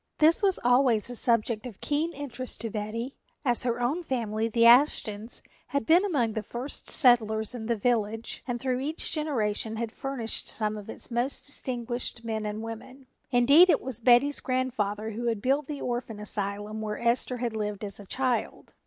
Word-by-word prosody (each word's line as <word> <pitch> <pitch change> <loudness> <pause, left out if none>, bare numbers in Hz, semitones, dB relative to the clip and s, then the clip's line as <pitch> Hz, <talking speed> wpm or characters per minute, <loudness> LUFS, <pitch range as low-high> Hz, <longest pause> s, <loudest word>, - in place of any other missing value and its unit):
This 315 +2 +5
was 390 -3 +3
always 245 -2 +3
a - - -6
subject 230 -1 +2
of 220 -6 -11
keen 305 +3 -1
interest 260 -5 -5
to 225 -1 -4
Betty, 225 +5 -4 0.3
as 240 -2 +2
her 240 -1 -1
own 265 +9 0
family, 230 -7 -2
the 230 +1 +3
Ashtons, 235 -3 +3 0.2
had 280 -5 -2
been 345 - +5
among 265 - 0
the 220 - -2
first 240 +6 -6
settlers 220 -4 +3
in 225 -3 -6
the 235 - +1
village 225 0 -1
and 245 -1 -2
through 255 -1 -1
each 300 +4 -1
generation 225 -8 -1
had 225 0 -3
furnished 260 -4 -3
some 215 -1 -1
of 210 0 -9
its - - -5
most 240 +4 -1
distinguished 245 -3 -3
men 220 -1 -2
and 210 +1 -4
women. 235 +4 -9 0.2
Indeed, 280 +8 +6
it - - +4
was 250 -3 -5
Betty's 250 +4 +4
grandfather 220 -5 -2
who 235 +3 -4
had 225 -3 0
built 270 +5 0
the 295 -2 -5
orphan 240 -3 -3
asylum 205 +1 -3
where 210 -1 -3
Esther 240 +1 +1
had 235 -2 -3
lived 210 -1 -3
as 200 -1 -2
a 205 - -10
child. 255 +1 -2
240 Hz, 180 wpm, -27 LUFS, 220-260 Hz, 0.3 s, Indeed